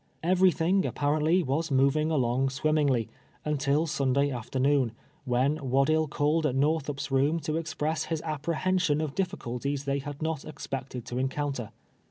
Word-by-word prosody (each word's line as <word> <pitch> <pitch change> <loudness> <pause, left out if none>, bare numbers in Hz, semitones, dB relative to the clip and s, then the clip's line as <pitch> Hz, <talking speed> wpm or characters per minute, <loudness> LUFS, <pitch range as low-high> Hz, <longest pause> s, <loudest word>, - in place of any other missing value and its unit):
Everything, 185 +1 +3
apparently, 155 +4 +1
was 155 +4 -1
moving 140 +3 +3
ah)ng 130 -3 +1
swim 155 +3 0
mingly, 130 -7 +2 0.4
until 150 +1 +1
Sunday 140 -2 +1
afternoon, 130 +1 +1 0.3
when 130 +4 +1
Waddill 140 +3 +2
called 150 +2 +1
at 130 - -2
jSTorthup's 145 0 0
room 140 +5 +2
to 155 +1 -2
express 160 -1 -2
his 160 -1 -2
apj)rehension 165 +1 0
of 150 -3 -4
dif 190 +1 0
ficulties 140 -4 -4
they 140 0 0
had 145 +1 -7
not 160 -2 -2
expected 135 -4 -6
to 120 - -4
encounter. 135 -3 -2
145 Hz, 145 wpm, -28 LUFS, 135-155 Hz, 0.4 s, Everything